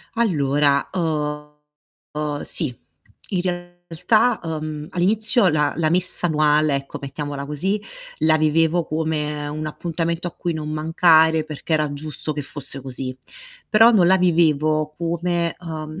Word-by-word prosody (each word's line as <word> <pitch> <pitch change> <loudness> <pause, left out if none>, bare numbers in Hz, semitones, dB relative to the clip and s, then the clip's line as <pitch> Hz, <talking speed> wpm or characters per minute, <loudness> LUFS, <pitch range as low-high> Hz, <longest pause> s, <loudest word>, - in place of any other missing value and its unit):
Allora, 145 -9 +2
uhm, 150 -2 -5
sì, 145 -7 0 0.5
in 180 -3 -1
realtà, 175 +5 0
uhm, 155 -2 -5
all'inizio 210 +4 +2
la 150 -2 +1
la 160 -2 +1
messa 180 +1 0
annuale, 150 -2 +2
ecco 140 0 -4
mettiamola 140 0 -5
così, 190 +8 -1 0.4
la 155 0 +4
vivevo 160 +2 +2
come 150 -1 -2
un 155 +1 -4
appuntamento 170 +2 -3
a 175 - -4
cui 175 - -3
non 155 -1 -5
mancare 160 0 +4
perché 155 +1 -3
era 150 -2 0
giusto 155 +1 -5
che 145 -1 -4
fosse 140 0 -7
così. 130 0 -6 0.5
Però 225 +2 +6
non 180 -5 +5
la 190 - +6
vivevo 155 -3 +2
come, 170 0 -1
uhm, 155 -1 -6
155 Hz, 130 wpm, -21 LUFS, 150-175 Hz, 0.5 s, Però